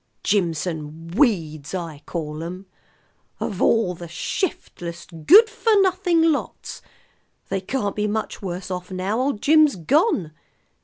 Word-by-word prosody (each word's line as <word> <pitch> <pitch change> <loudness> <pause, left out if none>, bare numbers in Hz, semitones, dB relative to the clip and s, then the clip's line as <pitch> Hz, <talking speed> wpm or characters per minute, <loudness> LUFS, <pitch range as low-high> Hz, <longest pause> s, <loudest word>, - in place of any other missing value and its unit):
"Jimson 165 -4 -2
weeds 165 - 0
I 165 -5 -6
call 155 -2 -4
'em. 180 +3 -7 0.7
Of 200 -4 -4
all 225 -6 +3
the 170 0 -9
shiftless, 170 - -4
good 325 - +6
for 440 -1 +2
nothing 365 -3 +2
lots! 295 - -4 0.7
They 195 -1 -1
can't 205 0 -2
be 210 0 0
much 220 +1 -3
worse 185 0 -5
off 180 0 -5
now 190 +4 -2
old 260 -5 -1
Jim's 310 -1 +5
gone." 205 - +1
190 Hz, 125 wpm, -22 LUFS, 170-275 Hz, 0.7 s, good